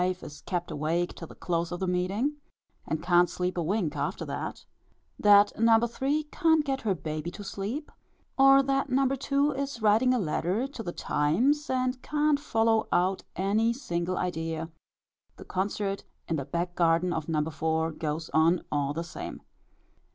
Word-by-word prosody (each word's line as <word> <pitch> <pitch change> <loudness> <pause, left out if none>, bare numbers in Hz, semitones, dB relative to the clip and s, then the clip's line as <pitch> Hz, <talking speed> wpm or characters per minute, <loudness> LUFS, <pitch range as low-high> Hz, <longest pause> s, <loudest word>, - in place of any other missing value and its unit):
is 180 -5 -4
kept 175 -1 -2
awake 165 +4 -1
till 165 - -9
the - - -13
close 170 -1 -2
of 175 - -4
the 190 - -1
meeting, 190 +10 0 0.5
and 160 +1 -2
can't 175 0 +4
sleep 180 +1 -2
a 175 - -1
wink 170 -2 -1
after 145 0 -2
that; - - -5 0.5
that 205 0 +6
No. 230 0 +6
3. 270 +6 -1
can't 320 -3 +3
get 270 -1 -1
her 200 -4 0
baby 155 0 -4
to 205 +4 -9
sleep; 215 +10 -5 0.4
or 270 0 +7
that 275 0 0
No. 265 +1 +3
2. 275 +2 +1
is 275 -2 -4
writing 220 +4 +4
a 255 - +3
letter 185 +4 0
to 275 -4 -7
the 175 - -4
Times, 250 - +1
and 255 0 0
can't 300 -1 +1
follow 225 -5 +1
out 185 +2 +2
any 215 +5 +2
single 180 -8 -3
idea; 165 -2 -3 0.7
the - - -11
concert 195 +1 -2 0.2
in 165 - 0
the 140 -3 -3
back 175 +3 -2
garden 170 +1 +2
of 160 0 -4
No. 155 -2 +1
4. 160 +1 0
goes 155 0 -4
on 165 +2 +3
all 145 -1 0
the 165 - -2
same. 175 +2 -8
185 Hz, 170 wpm, -28 LUFS, 165-255 Hz, 0.7 s, or